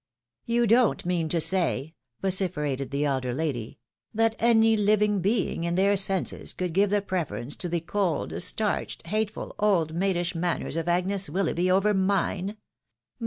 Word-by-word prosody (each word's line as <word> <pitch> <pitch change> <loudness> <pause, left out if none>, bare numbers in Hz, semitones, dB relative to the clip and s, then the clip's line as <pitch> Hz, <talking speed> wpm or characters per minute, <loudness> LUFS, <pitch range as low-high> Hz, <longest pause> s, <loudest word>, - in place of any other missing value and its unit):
" - - -65
You 235 0 +2
don't 230 -2 +3
mean 175 -3 -1
to 170 - +2
say," 165 -3 +1 0.3
vociferated 150 -8 0
the 140 +1 -1
elder 130 -3 -1
lady, 135 -7 -3 0.2
" - - -55
that 225 0 +2
any 225 -1 +4
Uving 210 -1 +2
being 195 -3 0
in 170 0 -1
their 200 +2 +3
senses 195 -1 0
could 180 -2 -3
give 200 +3 +3
the 205 0 +1
preference 165 -8 -3
to 180 - -2
the 170 0 -1
cold, 180 -1 -2
starched, 215 -5 0
hateful; 215 +4 -3
old 180 -7 +2
maidish 180 0 -1
manners 170 -1 -2
of 165 0 -3
Agnes 185 +3 0
Wil 195 +1 0
loughby 175 +2 0
over 195 +3 +3
mine 195 +1 0
185 Hz, 165 wpm, -26 LUFS, 165-205 Hz, 0.3 s, any